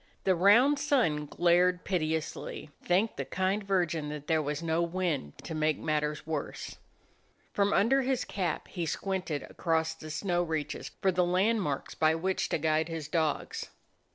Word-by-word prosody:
The 190 - +4
round 230 +11 +5
sun 195 - +1
glared 175 +3 +3
pitilessly; 160 -4 -2
thank 190 +5 +1
the - - -1
kind 190 +2 -1
Virgin 175 -6 0
that 150 -1 -6
there 160 0 +2
was 150 +2 -3
no 165 0 +1
wind 170 - -2
to - - -6
make 155 -1 +1
matters 150 -1 -1
worse. 155 -2 -4 0.8
From 200 0 +2
under 245 +8 +4
his 260 -1 0
cap 180 -5 -2
he 175 -3 -4
squinted 180 -5 -2
across 160 -1 -1
the 155 -1 -10
snow 175 +2 0
reaches 160 -3 -3
for 190 - +4
the 180 0 +2
landmarks 180 -4 0
by 155 0 +3
which 185 +3 -1
to - - +1
guide 155 +1 +1
his 160 -3 -4
dogs. 155 -1 -1
170 Hz, 155 wpm, -30 LUFS, 155-190 Hz, 0.8 s, round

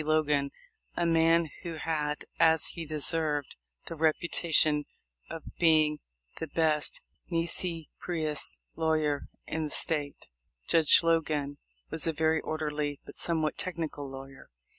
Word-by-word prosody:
Logan, 150 -2 +2 0.5
a 175 - +2
man 165 0 +4
who 170 -2 -5
had, 150 -2 -2
as 160 -2 +5
he 165 -2 -6
deserved, 150 -1 -1 0.3
the - - -6
reputa 165 +1 0
tion 150 -1 +4 0.4
of 165 - -6 0.2
being 155 -3 +4 0.4
the 160 - -3
best 155 -1 +2 0.3
nisi 165 -1 0
prins 155 -4 -1 0.2
lawyer 155 -3 0 0.2
in 160 -1 -2
the - - -4
State. 145 -2 -2 0.4
Judge 160 -3 +6
Logan 150 -4 0 0.3
was 160 +1 -1
a 165 - +1
very 160 +1 +2
orderly 150 -2 -2
but - - -10
somewhat 160 -2 -1
technical 160 -6 -4
lawyer. 135 0 -10
155 Hz, 125 wpm, -29 LUFS, 150-165 Hz, 0.5 s, Judge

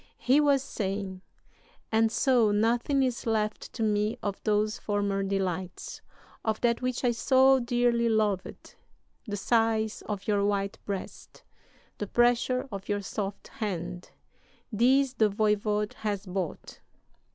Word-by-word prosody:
"He 255 +5 +3
was 285 -2 +3
saying: 195 -5 -4 0.7
'And 225 0 +3
so 245 -3 +3
nothing 235 +6 +2
is 250 -2 -2
left 215 -1 -1
to 230 - -2
me 210 +2 +1
of 200 -2 -3
those 215 0 +1
former 200 -1 -1
delights, 190 -2 -3 0.4
of 220 -1 -1
that 235 0 +2
which 255 0 -2
I 245 - +3
so 265 +3 +4
dearly 240 -1 +1
loved! 210 -4 -1 0.5
The 205 -1 -3
sighs 225 0 +1
of 205 -2 -4
your 205 -2 +2
white 200 -1 -1
breast, 200 -2 -7 0.6
the 205 - -3
pressure 245 +3 +2
of 195 0 -7
your 205 0 0
soft 200 0 -5
hand 180 -7 -5 0.6
these 260 +4 +3
the 220 -4 +3
voyvode 210 0 0
has 210 -2 -2
bought! 185 -3 -5
215 Hz, 130 wpm, -28 LUFS, 200-240 Hz, 0.7 s, so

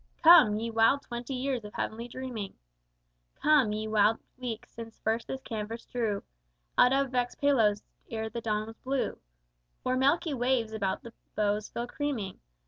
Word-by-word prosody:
_ - - -32
Come, 315 -11 +8
ye 230 +1 -3
wild 225 +5 +4
twenty 240 +2 -5
years 255 -2 -1
of 210 - -10
heavenly 230 +2 -3
dreaming! 245 -5 -6 0.8
Come, 295 -7 +4
ye 215 +1 -2
wild 215 +1 +4 0.2
weeks 235 -3 -5
since 225 -1 -9
first 225 +1 -1
this 265 0 -5
canvas 225 0 -5
drew 220 -5 -2 0.5
Out 250 - +6
of 270 -1 +2
vexed 245 -1 -1
Palos 225 -8 +3 0.3
ere 220 -1 -3
the 235 +1 -5
dawn 215 -1 -1
was 225 0 -11
blue, 265 0 -2 0.7
O'er 255 - +2
milky 285 +4 +2
waves 245 -3 +1
about 195 -3 -2
the 235 - -10 0.2
bows 210 0 0
full 235 - -3
creaming! 245 -7 -3
230 Hz, 165 wpm, -29 LUFS, 215-260 Hz, 0.8 s, Come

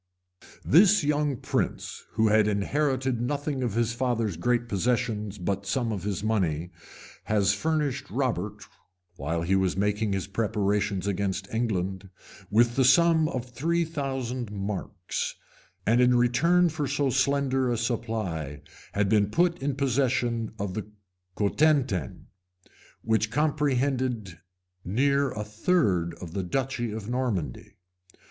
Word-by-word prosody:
This 190 +4 +6
young 145 -2 +1
prince, - - -3
who 110 0 +3
had 110 0 +4
inherited 130 +4 0
nothing 140 +2 -2
of 120 -5 -1
his 115 -1 +1
father's 115 -6 -1
great 120 +7 0
possessions 110 -1 -1
but 100 +2 -3
some 115 +3 0
of 100 -4 -3
his 100 0 -3
money, 90 -6 0 0.5
has 100 -2 +2
furnished 145 +2 -1
Robert, 105 -4 -2 0.5
while 80 +3 -2
he 95 +3 +2
was 95 -1 +1
making 105 +1 0
his 95 -1 -1
preparations 100 -2 0
against 100 0 -2
England, 95 -4 -2 0.4
with 120 +4 +3
ihe 130 - +5
sum 160 +3 +5
of 130 -2 -3
three 165 +7 0
thousand 130 -7 -3
marks; 100 -1 -4 0.5
and 120 +3 +4
in 125 0 +5
return 160 +9 +4
for 155 -3 -2
so 140 0 0
slender 135 -1 +1
a 120 - 0
supply, 105 - -3 0.3
had 100 0 +1
been 105 0 +3
put 170 +6 +1
in 140 -1 -1
possession 125 -4 0
of 100 -3 -3
the 105 +1 -4 0.5
Cotentin, 125 - +1 0.8
which 110 0 +1
comprehended 130 - 0 0.4
near 140 +7 +2
a 105 -3 -4
third 105 - +1
of 85 -3 -9
the 95 - -1
duchy 120 +4 -2
of 105 -1 -6
Normandy. 115 - -3
115 Hz, 130 wpm, -27 LUFS, 100-135 Hz, 0.8 s, This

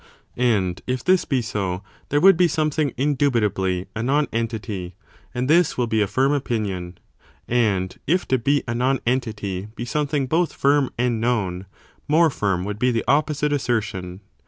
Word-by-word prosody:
And 105 -8 +1
if 125 0 -2
this 185 0 +3
be 130 -5 0
so, 100 -3 -3 0.3
there 145 - +2
would 195 +3 +7
be 175 +1 +4
something 155 -3 0
indubitably 110 -10 +1
a 110 - -2
non 145 +5 +1
entity, 110 -6 -3 0.4
and 125 0 -2
this 170 +4 +3
will 125 - +1
be 110 -2 0
a 105 - +2
firm 130 +7 +1
opinion; 105 -10 -2 0.5
and 100 -6 +1
if 180 +5 +1
to 130 - +2
be 140 +4 +1
a 120 - -1
non 130 +2 +1
entity 105 -6 -2
be 120 - -5
something 145 +2 -1
both 165 +6 0
firm 140 -1 +2
and 120 -2 0
known, 100 -6 -1 0.4
more 160 +1 +4
firm 95 -7 -1
would 105 +1 -5
be 125 - +3
the 115 -2 -1
opposite 150 +2 +1
assertion. 100 -9 -2
120 Hz, 165 wpm, -22 LUFS, 100-145 Hz, 0.5 s, would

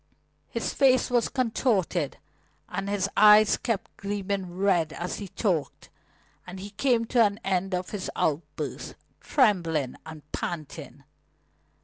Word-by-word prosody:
His - - -3
face 260 -2 +3
was 240 -1 +2
contorted, 215 - 0 0.5
and 195 +1 -4
his 200 -1 0
eyes 210 0 +7
kept 225 -5 -3
gleaming 200 -2 -3
red 180 -5 +2
as 175 +2 -4
he 200 - -6
talked, 180 -6 -2 0.6
and 185 +1 -8
he 200 +2 -8
came 230 +2 +1
to 240 +2 0
the 205 -3 +4
end 190 0 0
of 180 0 -4
his 200 -3 -4
outburst, 150 0 -3 0.2
trembling 170 - +1
and 155 -2 -10
panting. 155 -4 -6
195 Hz, 125 wpm, -27 LUFS, 175-215 Hz, 0.6 s, eyes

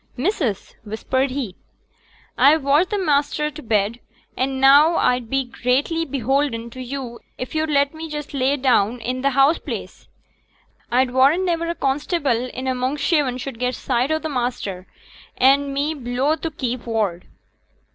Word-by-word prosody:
'Missus!' 265 - -1
whispered 260 +5 -1
he, 255 -8 -4 0.8
'a've 300 +1 +5
watched 290 +6 +3
t' 415 - -1
maister 300 -3 +1
t' 305 +1 -10
bed; 220 -1 0 0.4
an' 265 +1 -1
now 285 +5 +6
a'd 250 -2 +1
be 270 0 +1
greatly 270 +7 0
beholden 265 -3 -1
to 255 - -8
yo' 255 -2 -6 0.2
if 255 - -6
yo'd 315 0 0
let 285 0 +2
me 320 0 -7
just 295 -1 -6
lay 275 0 +1
me 265 - -14
down 240 -2 +3
i' 250 - -1
t' 275 - +2
house 275 +4 +3
place. - - -7 0.8
A'd 250 +1 +2
warrant 275 +9 +4
niver 335 -2 0
a 340 - -2
constable 275 -3 0
i' - - -7 0.2
a' 260 - +1
Monkshaven 265 +1 0
should 255 -2 -7
get 250 0 -1
sight 250 +1 -1
o' 315 - +2
t' 315 - -4
maister, 240 -9 -3 0.5
an' 275 +2 +4
me 285 +3 -1
below 265 +2 0
t' 330 - -4
keep 250 -5 -4
ward.' 210 -6 -1
270 Hz, 165 wpm, -21 LUFS, 245-295 Hz, 0.8 s, now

